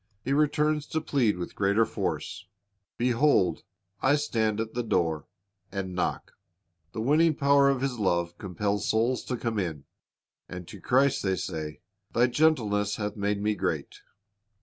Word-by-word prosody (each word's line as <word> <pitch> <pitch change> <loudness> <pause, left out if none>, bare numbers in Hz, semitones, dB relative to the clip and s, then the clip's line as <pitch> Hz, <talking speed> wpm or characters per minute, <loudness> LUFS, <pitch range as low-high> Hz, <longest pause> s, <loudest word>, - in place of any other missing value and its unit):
He 135 - +1
returns 150 0 +2
to 160 - -1
plead 130 - +1
with 90 - -5
greater 100 +3 +2
force, 100 - -4 0.5
"Behold, 120 - +2 0.4
I 130 +2 +4
stand 110 -8 0
at 110 0 -3
the 120 - -1
door, 85 - 0 0.4
and 95 -2 -4
knock." 90 - -2 0.6
The 110 - -3
winning 155 +6 +3
power 140 0 +4
of 135 -2 0
His 135 -3 -2
love 85 -3 0
compels 100 +2 -2
souls 115 +3 +1
to 125 - -2
come 115 -2 -2
in. 80 -7 -3 0.7
And 90 -1 -7
to 100 - -10
Christ 135 +2 +3
they 95 -1 +1
say, 75 -4 -5 0.3
"Thy 120 - +5
gentleness 115 -8 +2
hath 105 -1 -3
made 100 0 -1
me 105 0 +2
great." - - -3
110 Hz, 150 wpm, -27 LUFS, 95-135 Hz, 0.7 s, Thy